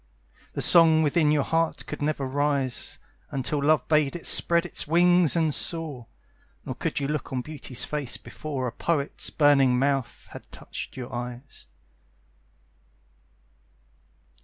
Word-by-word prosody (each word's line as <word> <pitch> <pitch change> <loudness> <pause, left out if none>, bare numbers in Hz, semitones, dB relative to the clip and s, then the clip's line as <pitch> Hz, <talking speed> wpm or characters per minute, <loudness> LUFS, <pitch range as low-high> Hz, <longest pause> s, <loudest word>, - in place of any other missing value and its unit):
The - - 0
song 160 -2 +6
within 150 +1 +2
your 150 -2 +2
heart 165 +2 -1
could - - -7
never 145 -2 -1
rise 140 -1 -1 0.3
Until 140 +2 -2
love 155 +1 +2
bade 150 -2 +2
it 175 - -7
spread 170 0 +3
its 175 - 0
wings 175 0 +4
and 160 -3 +1
soar. 150 -9 -2 0.6
Nor - - -4
could - - -3
you 140 - -2
look 150 0 -4
on 130 -1 -2
Beauty's 140 -3 -4
face 145 -5 -2
before 140 -4 -6
A 125 - -3
poet's 145 +2 -2
burning 140 -4 +3
mouth 135 -2 -1
had - - -12
touched - - -9
your 125 -2 -7
eyes. 125 - -8
145 Hz, 135 wpm, -25 LUFS, 130-160 Hz, 0.6 s, song